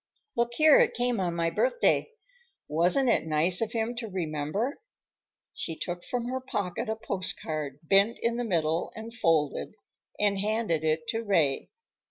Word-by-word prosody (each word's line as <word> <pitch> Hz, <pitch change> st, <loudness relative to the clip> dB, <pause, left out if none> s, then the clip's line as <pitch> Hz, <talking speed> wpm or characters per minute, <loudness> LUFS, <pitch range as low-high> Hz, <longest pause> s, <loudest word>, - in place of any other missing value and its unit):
Look 235 Hz, 0 st, 0 dB
here, 310 Hz, +1 st, +7 dB
it -, -, +3 dB
came 245 Hz, -2 st, 0 dB
on 175 Hz, -2 st, -1 dB
my 165 Hz, 0 st, 0 dB
birthday. -, -, +2 dB, 0.6 s
Wasn't 175 Hz, -, +2 dB
it 235 Hz, -, +2 dB
nice 160 Hz, +5 st, +2 dB
of 225 Hz, -1 st, -1 dB
him 230 Hz, +1 st, -1 dB
to 235 Hz, -2 st, -4 dB
remember?" 180 Hz, -, -3 dB, 0.7 s
She 165 Hz, -, -3 dB
took 175 Hz, 0 st, -4 dB
from 245 Hz, -1 st, -3 dB
her 260 Hz, +1 st, -2 dB
pocket 205 Hz, -6 st, -3 dB
a 220 Hz, -, 0 dB
postcard, 160 Hz, -9 st, -2 dB
bent 195 Hz, +7 st, +3 dB
in 235 Hz, 0 st, 0 dB
the 245 Hz, -, -1 dB
middle 165 Hz, -6 st, 0 dB
and 225 Hz, +1 st, -8 dB
folded, 165 Hz, -4 st, 0 dB, 0.4 s
and 205 Hz, -1 st, +2 dB
handed 210 Hz, -6 st, 0 dB
it 155 Hz, 0 st, 0 dB
to 225 Hz, -, -1 dB
Ray. 160 Hz, -10 st, +1 dB
200 Hz, 160 wpm, -28 LUFS, 165-235 Hz, 0.7 s, here